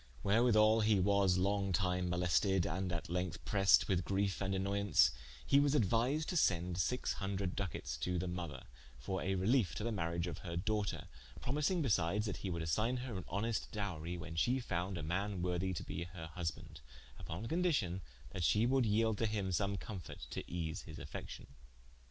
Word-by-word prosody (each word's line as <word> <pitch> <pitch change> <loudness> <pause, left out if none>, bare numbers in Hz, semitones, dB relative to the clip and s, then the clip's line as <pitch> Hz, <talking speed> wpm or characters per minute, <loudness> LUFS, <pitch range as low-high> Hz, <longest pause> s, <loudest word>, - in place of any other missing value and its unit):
Wherewithall 110 0 +5
hee 105 -2 +4
was 100 -1 +3
long 100 +1 +1
tyme 90 0 +1
molested, 90 +1 +2
and 90 +2 -2
at 85 -1 -3
lengthe 90 0 -3
pressed 100 -1 +5
with 95 -2 +1
griefe 100 +1 0
and 95 0 0
annoyance, 100 -9 +3 0.3
hee 140 - +5
was 145 0 +3
aduised 125 +6 +2
to 180 - 0
sende 90 - +2
sixe 125 +6 0
hundred 95 -2 -2
ducates 90 -9 -4
to 90 +7 -1
the 90 +2 -2
mother, 85 -6 -5 0.3
for 80 +10 -3
a 95 +1 0
reliefe 105 +3 +2
to - - -3
the 115 - -1
mariage 85 -4 -1
of 85 -4 -5
her 85 -2 -5
doughter, 105 +2 -1 0.3
promising 150 +6 0
besides, 105 -3 +1
that 105 - -3
he 95 - -4
would 85 -2 -2
assigne 110 +10 +1
her 125 -4 -5
an 95 - -5
honest 110 +3 -2
dowrie, 90 -5 -3
when 85 -1 -7
she 125 +10 +2
found 90 -5 -2
a 80 - -4
man 95 +3 -2
worthy 90 +1 0
to 85 - -4
be 85 - -4
her 85 -2 -9
husbande: 80 -3 -5 0.4
vppon 95 +8 -5
condicion 145 - +1 0.3
that 90 - -3
she 105 +7 +4
would 130 0 +3
yelde 110 0 +2
to 115 - +2
him 100 -3 -1
some 100 +2 0
comforte, 95 -5 -7
to - - -4
ease 85 +1 -3
his 80 -1 -10
affection. 75 -1 -7
95 Hz, 185 wpm, -36 LUFS, 85-105 Hz, 0.4 s, Wherewithall